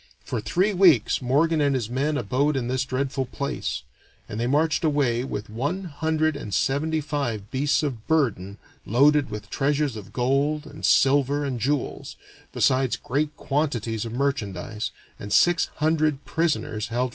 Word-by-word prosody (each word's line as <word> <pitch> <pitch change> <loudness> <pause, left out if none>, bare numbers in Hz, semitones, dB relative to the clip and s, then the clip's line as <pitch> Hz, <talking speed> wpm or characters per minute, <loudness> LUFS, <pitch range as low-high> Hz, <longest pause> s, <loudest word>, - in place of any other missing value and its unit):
For 120 - -3
three 185 - +1
weeks 170 - +4
Morgan 150 +5 +2
and 140 -2 +2
his 120 -5 -1
men 140 +5 -1
abode 135 +5 0
in 120 -2 -2
this 130 +1 0
dreadful 135 0 -2
place; 140 +2 -3 0.4
and 105 - -5
they 120 - 0
marched 155 +5 +1
away 140 -6 +1
with 105 -5 -5
one 145 - -3
hundred 155 -1 0
and 110 -7 -7
seventy 155 +4 +1
five 130 -9 -3
beasts 140 +3 +1
of 125 -7 -4
burden 105 - 0 0.3
loaded 145 +5 +3
with 105 -1 -7
treasures 145 -2 0
of 105 -2 -9
gold 140 +4 0
and - - -11
silver 140 +1 +3
and 130 -3 -3
jewels, 140 +3 -2 0.4
besides 130 -1 +2
great 145 +3 -2
quantities 120 -7 -1
of 115 - -5
merchandise, 115 -5 -2 0.3
and 100 - -7
six 175 - +4
hundred 155 -2 +1
prisoners 150 -10 -1
held - - -16
for 120 +2 0
ransom. 130 - -1
140 Hz, 160 wpm, -24 LUFS, 120-150 Hz, 0.4 s, weeks